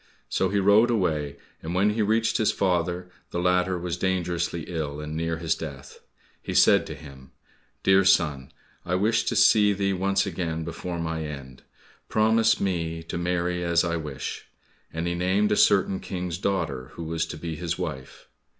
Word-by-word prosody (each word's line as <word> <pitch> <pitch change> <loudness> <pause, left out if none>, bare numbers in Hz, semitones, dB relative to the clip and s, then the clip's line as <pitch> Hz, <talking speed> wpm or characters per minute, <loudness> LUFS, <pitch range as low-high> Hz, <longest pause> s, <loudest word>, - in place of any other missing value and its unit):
So 95 - +1
he 100 - 0
rode 100 +4 +5
away, 80 -10 0 0.3
and 85 +2 -4
when 100 +3 +3
he 110 +1 -1
reached 110 +2 +2
his 110 - +2
father, 90 -1 -1 0.2
the - - -4
latter 90 +1 +2
was 90 0 -3
dangerously 90 -2 -1
ill, 75 -4 -4
and 75 +1 -6
near 80 0 -1
his 85 -1 0
death. 70 -4 -8 0.4
He - - -5
said - - +5
to - - -6
him, 65 -3 -13 0.5
"Dear 95 0 +5
son, 75 -8 +2 0.3
I 90 +1 -1
wished 110 +4 +1
to - - 0
see 105 -2 +5
thee 100 0 0
once 95 +2 +1
again 80 -3 -3
before 85 +2 -5
my 80 -1 -3
end, 70 -3 -8 0.5
promise 110 +1 +3
me 85 -4 -2
to 80 - -5
marry 90 0 -1
as 85 -1 +2
I 85 -1 -1
wish," 75 -5 -5 0.4
and 80 +2 -3
he 85 - -1
named 95 +4 +1
a - - +4
certain 95 -2 +3
King's 90 -2 -4
daughter 70 -11 -2
who 85 - -7
was 80 +1 -2
to - - -7
be 80 -2 -5
his 85 0 -3
wife. 65 -1 -6
85 Hz, 175 wpm, -25 LUFS, 80-95 Hz, 0.5 s, rode